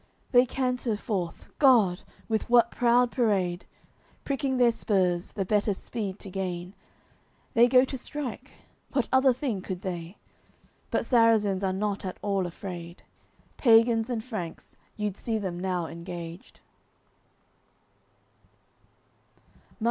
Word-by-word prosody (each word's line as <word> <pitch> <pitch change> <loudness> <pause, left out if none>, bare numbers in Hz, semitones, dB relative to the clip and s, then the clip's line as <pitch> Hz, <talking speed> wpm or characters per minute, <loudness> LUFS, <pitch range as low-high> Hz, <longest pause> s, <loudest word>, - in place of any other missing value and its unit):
They 245 0 +6
canter 250 -3 -1
forth, 190 -7 -4
God! 225 -11 +5 0.3
with 220 0 -1
what 235 -1 +5
proud 245 0 +3
parade, 195 -8 0 0.6
Pricking 270 -1 -1
their 245 -1 +5
spurs, 185 -6 0
the 195 -3 -2
better 205 +1 +1
speed 200 -2 -5
to 195 - -8
gain; 180 -1 -4 0.8
They 240 -1 +6
go 255 +1 +5
to 265 - -6
strike, 260 -1 -6 0.4
what 265 -5 +1
other 260 0 +5
thing 245 -6 -2
could 185 -1 -6
they? 175 0 -5 0.7
But - - 0
Sarrazins 225 -5 +3
are 190 - +1
not 200 +1 -2
at 185 -1 -5
all 195 -3 0
afraid. 175 -1 -8 0.5
Pagans 230 -1 +4
and 230 -3 -2
Franks, 215 -9 -7 0.2
you'ld 210 -2 -2
see 225 -2 -2
them 185 -4 -4
now 180 -2 -1
engaged. 170 +1 -8
210 Hz, 120 wpm, -27 LUFS, 185-240 Hz, 0.8 s, They